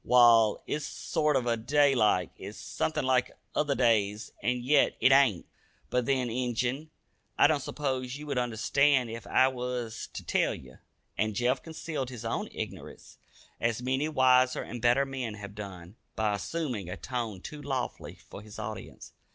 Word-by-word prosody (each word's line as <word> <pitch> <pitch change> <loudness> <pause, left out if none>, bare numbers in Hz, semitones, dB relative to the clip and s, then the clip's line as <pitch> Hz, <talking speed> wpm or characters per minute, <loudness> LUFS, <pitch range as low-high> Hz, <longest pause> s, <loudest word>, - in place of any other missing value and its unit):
Wall, 115 -3 +5
it's 150 0 -3
a - - -8
sorter 135 -6 0
day 140 +5 +3
like. 105 -7 +2
It's 100 +3 -9
somethin' 155 - -2
like 130 -1 +1 0.2
other 145 -2 +1
days, 105 -4 +1
an' 125 +4 +1
yet 140 +3 +3
it 130 - +5
ain't. 135 -10 +4 0.5
But 125 -1 +1
then, 130 -2 +1
Injun, 125 +4 -2 0.5
I - - +6
don't 150 0 +4
s'pose 130 -2 -3
ye 150 - -9
would 140 -4 -1
understand 125 +2 +2
ef 115 0 -7
I 130 - +4
wuz 125 -3 -4
ter - - -7
tell - - +1
ye." 65 -1 -13 0.5
And 110 -1 0
Jeff 125 +4 +1
concealed 155 -5 -5
his 120 -3 -8
own 115 - -2
ignorance, - - -8 0.4
as 115 +1 -1
many 130 +4 0
wiser 130 -3 +4
and 120 0 -7
better 120 +3 +4
men 130 -5 -4
have 100 -1 -9
done, 95 -2 -9 0.2
by 105 -1 +1
assuming 115 - -3
a - - -5
tone 120 -6 -4
too 150 +10 -8
lofty 135 -3 -4
for - - -9
his 105 0 -12
audience. 110 -2 -7
125 Hz, 165 wpm, -29 LUFS, 110-135 Hz, 0.5 s, I